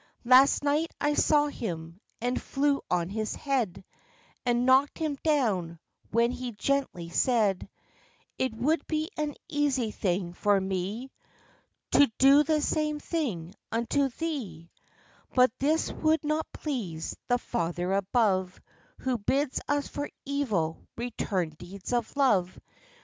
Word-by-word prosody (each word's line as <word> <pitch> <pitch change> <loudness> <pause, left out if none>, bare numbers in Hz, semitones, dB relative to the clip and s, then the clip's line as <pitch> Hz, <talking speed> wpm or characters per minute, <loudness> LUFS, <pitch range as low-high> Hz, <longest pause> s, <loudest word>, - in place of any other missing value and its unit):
Last 260 +4 +6
night 300 +3 +1
I 295 0 +1
saw 295 0 +4
him, 170 - -5 0.2
and 245 +2 -1
flew 280 0 +1
on 175 -1 0
his 215 +2 -3
head, 245 -10 -1 0.6
And 240 0 +2
knocked 265 +2 +4
him 310 -4 -2
down, 210 - +1 0.3
when 235 +2 +2
he 250 -1 -5
gently 210 -8 -1
said, 210 0 +1 0.7
'It 260 -1 +1
would 295 +9 0
be 310 0 -1
an 300 -1 -2
easy 285 -8 0
thing 180 -3 -1
for 205 +2 +2
me 195 +7 -3 0.8
To 285 -5 +5
do 275 +2 +7
the 305 0 +1
same 305 -1 0
thing 220 - -3 0.2
unto 235 +5 +1
thee; 235 - -5 0.6
But 250 -2 +6
this 310 +4 +1
would 315 0 +1
not 305 +1 -1
please 205 - -4
the 245 - +3
Father 175 -4 -2
above, 195 -2 +1 0.4
Who 255 -2 0
bids 270 +6 0
us 290 0 0
for 290 0 -4 0.2
evil 220 - -1 0.2
return 205 -8 -2
deeds 190 +5 -7
of 240 +1 -1
love. 195 -10 +2
245 Hz, 130 wpm, -28 LUFS, 190-285 Hz, 0.8 s, do